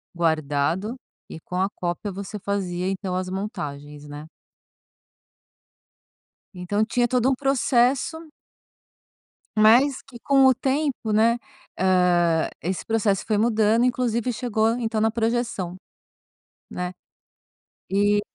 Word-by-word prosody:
guardado 160 - 0 0.3
e - - -8
com 180 - -8
a 190 - +2
cópia 175 +4 -3
você 200 +2 -7
fazia 185 -3 -2
então 190 -1 -3
as 185 0 -2
montagens, 150 -7 -6
né? 145 +1 -9 2.3
Então, 185 +3 -1
tinha 240 +2 +1
todo 250 +1 +2
um 270 - +2
processo 265 +2 +1 1.4
mas 245 +6 +5
que 240 -3 -13
com 270 +2 +4
o 260 - +7
tempo, 265 -2 -1
né, 225 +3 +3 0.4
hã, 175 -3 +3
esse 180 +2 -3
processo 215 -3 0
foi 215 - +1
mudando, 220 +1 +3
inclusive, 245 -1 0
chegou, 225 -2 0
então, 225 -2 -1
na 225 +1 +2
projeção, 225 -6 -1 1.0
né, 180 0 -4 1.0
e, 205 +1 +2
210 Hz, 110 wpm, -24 LUFS, 180-240 Hz, 2.3 s, o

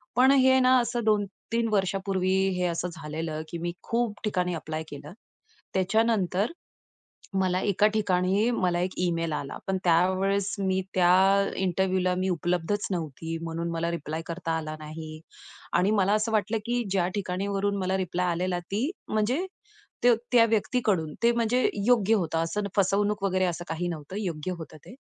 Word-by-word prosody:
पण 260 +2 +6
हे 260 -1 +5
ना 255 0 +5
असं 240 0 -1
2-3 215 +2 0
वर्षापूर्वी 190 -1 +1 0.2
हे 180 - 0
असं 170 +1 -2
झालेलं, 155 0 -4
की 170 - -5
मी 175 +1 -3
खूप 230 -2 -1
ठिकाणी 180 -4 0
ॲप्लाय 155 0 -4
केलं. 145 +4 -9 0.6
त्याच्यानंतर 200 - +1 0.9
मला 185 -1 +1
एका 200 +1 +3
ठिकाणी 200 +1 +2
मला 180 -7 +1
एक 180 +1 0
ईमेल 165 -2 0
आला, 140 -2 -4
पण 195 - 0
त्यावेळेस 185 +3 +2
मी 190 -1 +1
त्या 190 +2 +4
इंटरव्ह्यूला 185 0 +1
मी 185 +1 0
उपलब्धच 175 +4 -1
नव्हती. 165 -2 -4
म्हणून 165 +1 -3
मला 165 0 -1
रिप्लाय 160 -1 -4
करता 165 -1 -3
आला 155 -1 -5
नाही. 155 0 -8 0.5
आणि 190 +3 +3
मला 200 -2 +2
असं 215 +1 0
वाटलं, 220 +1 +1
की 240 +1 0
ज्या 185 -2 +1
ठिकाणीवरून 200 +1 -1
मला 190 0 0
रिप्लाय 180 -1 -1
आलेला, 180 +1 -1
ती 205 - -2 0.2
म्हणजे 240 - 0 0.6
ते 245 -1 +7 0.2
त्या 235 -2 +7
व्यक्तीकडून, 210 - 0
ते 235 - +5
म्हणजे 235 +2 +2 0.2
योग्य 225 -3 +4
होतं. 165 -6 0
असं 210 +5 -2
फसवणूक 200 +1 +2
वगैरे 185 -1 +2
असं 175 -1 -3
काही 170 +2 -2
नव्हतं. 165 +2 -6
योग्य 175 -3 -3
होतं 160 -1 -9
ते. - - -11
185 Hz, 155 wpm, -27 LUFS, 170-210 Hz, 0.9 s, ते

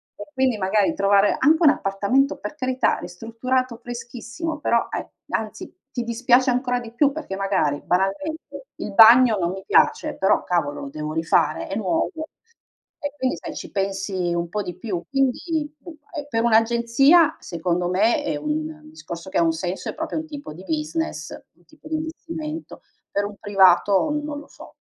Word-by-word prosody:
e - - -8
quindi 260 -4 +1
magari 205 +9 +2
trovare 200 -7 +3
anche 310 +4 +5
un 300 - +8
appartamento, 210 +6 +1
per 300 - -7
carità, 260 -2 +1
ristrutturato 230 +7 -2
freschissimo, 245 +6 -6
però 235 -5 +1
e - - -4 0.2
anzi - - -4 0.2
ti 240 - -3
dispiace 245 +2 +3
ancora 245 0 0
di 235 -2 -9
più 280 +4 +3
perché 285 -10 -6
magari 195 -7 0
banalmente 290 - -2
il 205 - -6
bagno 230 +1 +8
non 170 -1 0
mi 190 0 -7
piace, - - +2
però 190 - +2
cavolo 150 -5 -1
lo 140 - -6
devo 155 +1 -5
rifare, 160 -1 +1
è 195 - -4
nuovo 185 -6 0 0.9
e 290 -1 -3
quindi 260 0 0
sai - - -7
ci - - -8
pensi 195 -2 -2
un 170 0 -1
po' 210 +3 -2
di 180 - -7
più. 195 -7 -4
Quindi 295 +3 -1
b - - -12 0.2
e 290 -2 -5
per 225 -4 0
un'agenzia 235 +8 +4
secondo 175 +1 -2
me 205 +6 +2
è - - -2
un 150 +1 -2
un 155 0 -13
discorso 165 +3 -8
che 190 - -2
ha - - +4
un 165 - +3
senso 180 +3 -4
è - - -4
proprio 320 0 -4
un 315 - -3
tipo 290 - -8
di 180 +4 -12
business, 315 - -3 0.3
un - - -29
tipo 310 0 -16
di 315 - -2
investimento, 320 0 -6 0.3
per 200 0 0
un 205 0 -7
privato 195 - +4
non 295 -1 -5
lo 295 - -13
so. - - -14
225 Hz, 180 wpm, -23 LUFS, 185-280 Hz, 0.9 s, un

